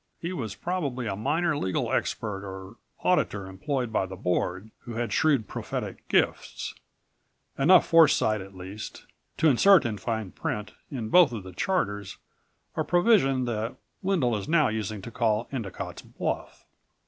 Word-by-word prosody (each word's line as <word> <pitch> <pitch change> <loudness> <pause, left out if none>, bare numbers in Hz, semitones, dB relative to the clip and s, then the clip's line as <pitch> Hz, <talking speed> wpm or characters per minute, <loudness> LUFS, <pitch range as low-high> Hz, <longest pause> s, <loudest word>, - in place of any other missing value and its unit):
He 170 +2 -4
was 110 - -4
probably 145 -8 -2
a 100 -3 -2
minor 160 - +1
legal 95 -10 -1
expert 105 -3 -1
or 95 +2 -8 0.3
auditor 105 - +1
employed 120 +5 -3
by 95 - +1
the 95 - -7
Board, 90 +3 -1
who 120 - -8
had 120 0 -2
shrewd 140 -9 +3
prophetic - - -5
gifts... - - 0 0.8
enough 170 +6 +6
foresight, 145 - +5
at 95 0 -11
least... 95 +3 -8 0.3
to 160 - +4
insert 170 +5 +6
in 110 -3 -2
fine 110 -5 -3
print 105 0 -4 0.2
in 120 -6 -4
both 180 -3 +6
of 110 -5 -5
the 95 -1 -10
charters 100 - -1 0.6
a - - 0
provision 175 - +3
that 115 -1 -2 0.3
Wendel 175 - +1
is 100 -2 -4
now 155 -5 +4
using 110 -2 -3
to 115 - -7
call 115 -1 +1
Endicott's 115 -9 -5
bluff. - - -4
115 Hz, 150 wpm, -27 LUFS, 100-150 Hz, 0.8 s, enough